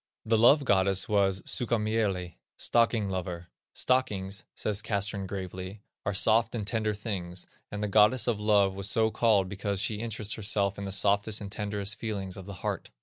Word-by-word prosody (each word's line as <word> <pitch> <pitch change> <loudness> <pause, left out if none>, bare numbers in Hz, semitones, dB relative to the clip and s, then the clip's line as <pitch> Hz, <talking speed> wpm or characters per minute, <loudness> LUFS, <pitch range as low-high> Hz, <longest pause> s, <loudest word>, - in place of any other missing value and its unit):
The 115 - +3
Love 135 +6 +5
goddess 95 -3 +2
was 95 -2 +1
Sukkamieli 105 -6 -1 0.2
(stocking 115 -3 +2
lover). 90 -2 -4 0.3
"Stockings," 100 -7 0
says 105 -1 -1
Castrén 100 -2 -2
gravely, 95 +1 -6 0.2
"are 100 - +1
soft 115 +4 +3
and 105 -3 -3
tender 110 0 -1
things, 95 -5 -4 0.3
and 105 +1 -4
the - - 0
goddess 105 +4 +4
of 115 -4 0
love 105 -2 +3
was 100 +1 -1
so 110 +1 +2
called 105 -6 +3
because 100 0 -3
she 105 +1 0
interests 110 -2 -3
herself 100 -2 0
in 100 - -4
the 95 - -4
softest 100 +2 +2
and 100 -1 -7
tenderest 105 0 -3
feelings 100 -5 -3
of 95 -1 -9
the 100 - -7
heart." - - -3
100 Hz, 170 wpm, -29 LUFS, 95-110 Hz, 0.3 s, Love